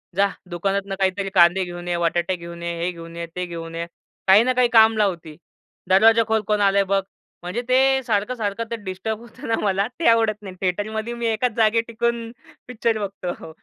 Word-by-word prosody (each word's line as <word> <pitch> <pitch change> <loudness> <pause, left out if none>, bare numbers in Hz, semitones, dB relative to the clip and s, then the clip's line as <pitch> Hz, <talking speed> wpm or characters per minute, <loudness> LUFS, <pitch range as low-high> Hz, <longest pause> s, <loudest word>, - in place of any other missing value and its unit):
जा 200 +1 +4 0.2
दुकानातनं 195 +2 -2
काहीतरी 195 +1 0
कांदे 175 0 +5
घेऊन 175 0 -7
ये, 175 -1 0
बटाटे 170 +1 0
घेऊन 170 0 -9
ये, 170 0 -2
हे 175 - 0
घेऊन 165 -1 -11
ये, 170 - -4
ते 180 0 -2
घेऊन 165 -1 -7
ये." 170 0 -3 0.4
काही 195 +4 +7
ना 255 +1 +1
काही 250 -1 +3
काम 220 0 +6
लावती, 175 -7 -1 0.5
"दरवाजाखोल 220 +3 +4
कोण 210 -1 +1
आलंय 200 0 +4
बघ". 195 - +3 0.4
म्हणजे 180 +7 -3
ते 265 +1 +4
सारखं-सारखं 215 -1 -1
ते - - 0
डिस्टर्ब 200 +3 -4
होतं 235 0 -11
ना, 225 - +2
मला 200 0 +1
ते 335 - +1
आवडत 225 -2 +3
नाही. 190 -3 -9
थिएटरमध्ये 215 +5 -2
मी 235 -1 -2
एकाच 230 +2 0
जागेत 225 0 +3
टिकून 230 0 -2 0.4
पिक्चर 230 -2 -1
बघतो. 185 -5 -6
200 Hz, 185 wpm, -22 LUFS, 180-225 Hz, 0.5 s, काही